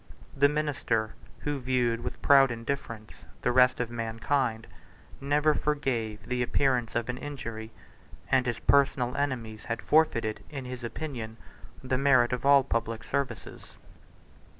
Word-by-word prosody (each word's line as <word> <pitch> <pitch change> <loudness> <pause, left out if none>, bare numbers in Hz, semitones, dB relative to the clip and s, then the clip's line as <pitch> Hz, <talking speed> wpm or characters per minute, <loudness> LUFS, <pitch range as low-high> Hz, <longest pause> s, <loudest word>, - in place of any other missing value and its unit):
The 140 +1 +5
minister, 140 -7 -1 0.3
who 145 -1 -2
viewed 125 -2 0
with 120 - -7
proud 135 -1 +6
indifference 115 -2 -5 0.3
the 125 - +2
rest 125 0 +4
of 120 -1 -2
mankind, 115 +1 -1 0.6
never 145 +2 +2
forgave 130 -9 -2
the 125 0 -2
appearance 125 -1 +1
of 115 - 0
an 125 0 -4
injury; 115 -6 -6 0.6
and 130 -1 +3
his 120 -2 -1
personal 130 -3 +2
enemies 120 -6 -3
had 115 -1 -3
forfeited, 120 -9 +1
in 135 -4 -6
his 125 -1 -7
opinion, 115 -3 -5 0.5
the 130 0 0
merit 130 -3 +4
of 125 +2 -1
all 140 -1 +7
public 115 -3 -2
services. 135 -4 -4
125 Hz, 135 wpm, -28 LUFS, 115-140 Hz, 0.6 s, all